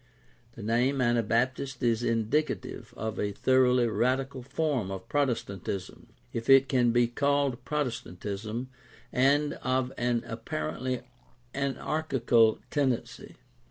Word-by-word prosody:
The 115 - -9
name 120 +5 +1
Anabaptist 125 +2 +1
is 115 -1 +2
indicative 115 +6 -1
of 110 0 -4
a 105 0 -1
thoroughly 125 +1 +3
radical 130 +3 0
form 135 -5 -1
of 95 -1 -6
Protestantism, 105 - -2 0.3
if 115 +1 -4
it 135 0 +7
can 125 -3 +3
be 120 +1 +4
called 140 +1 0
Protestantism, 115 -4 -3 0.4
and 145 +3 +3
of 130 0 0
an 120 -1 +1
apparently 115 +2 -3 0.5
anarchical 135 -5 +2
tendency. 135 -5 -1
125 Hz, 105 wpm, -29 LUFS, 115-135 Hz, 0.5 s, it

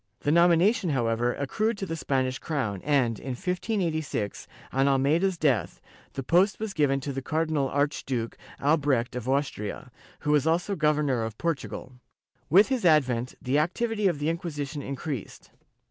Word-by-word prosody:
The 145 - +1
nomination, 175 +4 +4
however, 120 -3 +1
accrued 215 - -1
to 195 - -3
the 165 - -4
Spanish 130 -4 -1
crown 120 - -2
and, 130 -7 +1
in 130 - -4
1586, 165 - -2 0.3
on 135 +1 +3
Almeida's 155 +7 +2
death, 135 - +1 0.3
the 135 - -4
post 180 +8 +3
was 215 -2 -3
given 140 -4 +2
to 140 +1 -4
the 135 - -3
Car 160 +4 0
dinal 145 -4 0
Archduke 135 -5 -1 0.2
Albrecht 140 -5 +1
of 125 0 -4
Austria, 130 -3 -2 0.3
who 150 - 0
was 150 0 +3
also 175 +5 +1
Governor 150 -6 +1
of 110 -1 -5
Portugal.^ 135 -5 -4 0.5
With 195 - +6
his 260 -3 0
advent, 130 -7 +2
the 135 +3 +1
activity 210 +6 0
of 175 -5 +1
the 145 +2 -1
Inquisition 155 -4 -4
in 140 0 -4
creased. 135 -4 -6
145 Hz, 160 wpm, -27 LUFS, 130-170 Hz, 0.5 s, With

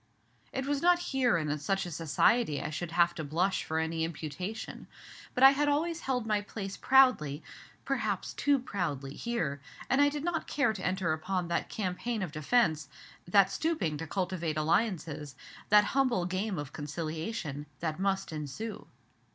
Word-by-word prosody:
It 265 0 -3
was 285 0 0
not 355 0 +5 0.2
here 255 -8 +3
and 155 -3 -1
in 150 - -2
such 195 +5 0
a 175 - -6
society 165 +3 +2
I - - -4
should 165 +2 -4
have 170 0 +4
to 160 - -5
blush 170 +7 0
for 160 - -3
any 160 0 0
imputation. 165 +6 -5 0.5
But 250 - +2
I 270 - +11
had 290 +1 +1
always 325 +3 0
held 250 -6 -1
my 210 -2 +1
place 200 -1 -6
proudly, 255 - +4 0.4
perhaps - - -1
too 285 -1 +3
proudly, 160 - -3
here, 165 -13 -2 0.3
and 270 +2 +4
I 285 - +6
did 290 0 -4
not 340 -1 -1
care 275 -7 +1
to 195 - -7
enter 180 -3 0
upon 180 +2 -2
that 170 - -1
campaign 210 +3 -2
of 180 - -4
defence 155 - +1 0.4
that 195 +1 +5
stooping 205 - -1
to 165 +2 -6
cultivate 175 -4 -2
alliances, 155 -4 0 0.3
that 210 0 +7
humble 255 -9 +2
game 190 +2 -2
of 145 -1 -5
conciliation 155 0 -4
that 160 0 -3
must 195 -1 0
ensue. 155 +9 -6
185 Hz, 170 wpm, -30 LUFS, 155-235 Hz, 0.5 s, I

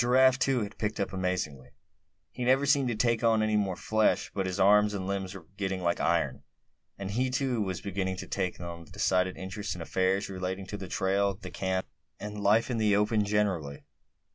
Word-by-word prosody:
Giraffe, 130 +2 +5
too, 130 -1 +2
had 105 - -8
picked 105 0 -2
up 100 - -2
amazingly; 90 -8 -2 0.6
he 125 - -5
never 130 +3 +3
seemed 140 -1 +3
to 120 - -1
take 115 +1 +1
on 110 -1 +4
any 110 0 +1
more 100 -3 +1
flesh; 110 +3 +1
but 95 -2 -1
his 95 +1 -3
arms 105 +1 +5
and 95 -2 -3
limbs 95 -1 -3
were 90 -4 -10
getting 95 -2 -2
like 85 0 +1
iron; 70 -5 +1 0.6
and 100 0 -5
he 125 +5 0
too 125 -2 0
was 95 -3 -2
beginning 95 -1 -2
to 90 - -7
take 95 -2 -2
a 85 -1 -7
decided 95 0 +1
interest 95 +2 -5
in 90 - -7
affairs 95 +3 +1
relating 95 0 -4
to 100 +2 -6
the 95 - -7
trail, 100 +1 +1
the 100 - -9
camp, 95 -1 -1 0.3
and 105 0 -6
life 110 +5 +3
in 115 - -1
the 105 -2 +3
open 105 +1 +2
generally. 95 -9 -1
100 Hz, 200 wpm, -29 LUFS, 95-110 Hz, 0.6 s, Giraffe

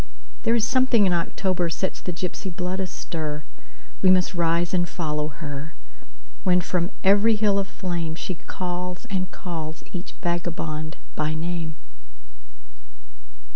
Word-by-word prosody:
There 230 - +3
is 230 -2 +4
something 255 -4 +5
in 180 - +4
October 175 +1 +1
sets 190 +3 -2
the 180 - -2
gypsy 180 +3 -3
blood 180 +1 -2
astir; 155 -5 -3 0.6
We 185 - +6
must 185 0 +5
rise 170 0 +2
and 175 -1 +2
follow 150 -3 -1
her, 150 0 -6 0.7
When 180 -1 +5
from 175 0 0
every 205 +3 +6
hill 205 -2 +3
of 195 - -1
flameShe 170 -2 -3
calls 180 +2 -3
and 185 -2 0
calls 160 -3 -5
each 180 -1 -5
vagabond 165 -3 -2 0.2
by 155 +1 0
name. 165 -1 -2
175 Hz, 130 wpm, -25 LUFS, 160-190 Hz, 0.7 s, We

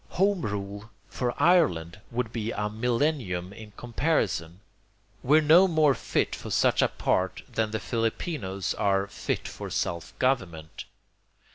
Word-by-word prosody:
Home 195 0 +3
rule 100 0 -5 0.2
for 120 +4 -2
Ireland 105 - +3
would 120 -1 -3
be 110 -2 -2
a 105 -1 -2
millennium 115 - -1
in 110 +1 -11
comparison. 110 - -1 0.6
We're 150 +5 +5
no 170 +6 +7
more 155 -5 +4
fit - - -1
for - - -8
such - - +3
a - - +4
part - - -1
than 110 -1 -1
the 110 +1 -3
Filipinos 115 - -2
are 100 -1 +1
'fit 100 - -3
for - - -7
self 85 -1 -3
government.' 90 -12 -1
110 Hz, 135 wpm, -27 LUFS, 95-145 Hz, 0.6 s, no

